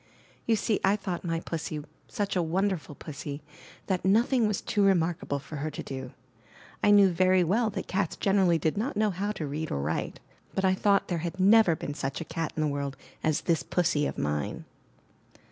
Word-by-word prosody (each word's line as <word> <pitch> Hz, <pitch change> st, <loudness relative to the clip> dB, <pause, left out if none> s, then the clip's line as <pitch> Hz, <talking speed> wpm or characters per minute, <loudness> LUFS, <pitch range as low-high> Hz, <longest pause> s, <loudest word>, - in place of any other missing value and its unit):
You 230 Hz, -, +4 dB
see 210 Hz, 0 st, 0 dB
I 195 Hz, +1 st, +4 dB
thought 190 Hz, -4 st, -4 dB
my 165 Hz, -2 st, -1 dB
Pussy 160 Hz, -3 st, -4 dB, 0.2 s
such 205 Hz, -4 st, -2 dB
a 180 Hz, -, +2 dB
wonderful 175 Hz, -2 st, -1 dB
Pussy 145 Hz, -1 st, -7 dB, 0.4 s
that 185 Hz, -2 st, -1 dB
nothing 230 Hz, +4 st, +3 dB
was 210 Hz, -2 st, -1 dB
too 205 Hz, -, -1 dB
remarkable 175 Hz, -6 st, +2 dB
for 145 Hz, +2 st, -8 dB
her 150 Hz, +2 st, -2 dB
to 150 Hz, -, -6 dB
do. 130 Hz, -2 st, -6 dB, 0.7 s
I -, -, +5 dB
knew 200 Hz, -2 st, +7 dB
very 185 Hz, +1 st, +4 dB
well 215 Hz, +7 st, +2 dB
that 195 Hz, -2 st, -4 dB
cats 190 Hz, -3 st, -1 dB
generally 190 Hz, -4 st, +3 dB
did 160 Hz, +3 st, -1 dB
not 230 Hz, 0 st, -2 dB
know 215 Hz, -1 st, +2 dB
how 200 Hz, +3 st, -2 dB
to 160 Hz, -, -4 dB
read 150 Hz, +2 st, -4 dB
or -, -, -2 dB
write; 75 Hz, +3 st, -2 dB, 0.4 s
but 190 Hz, -, +1 dB
I 185 Hz, -, +4 dB
thought 200 Hz, +1 st, +2 dB
there 175 Hz, -2 st, -1 dB
had 170 Hz, +3 st, -5 dB
never 200 Hz, -2 st, +6 dB
been 145 Hz, -, -5 dB
such 135 Hz, -1 st, -3 dB
a 165 Hz, -, -5 dB
cat 165 Hz, -1 st, -3 dB
in 155 Hz, -, -1 dB
the 155 Hz, -, +2 dB
world 140 Hz, -2 st, -3 dB, 0.3 s
as 155 Hz, -2 st, +1 dB
this 165 Hz, -4 st, +1 dB
Pussy 160 Hz, -1 st, +1 dB
of -, -, -5 dB
mine. 75 Hz, 0 st, -2 dB
175 Hz, 200 wpm, -28 LUFS, 155-200 Hz, 0.7 s, knew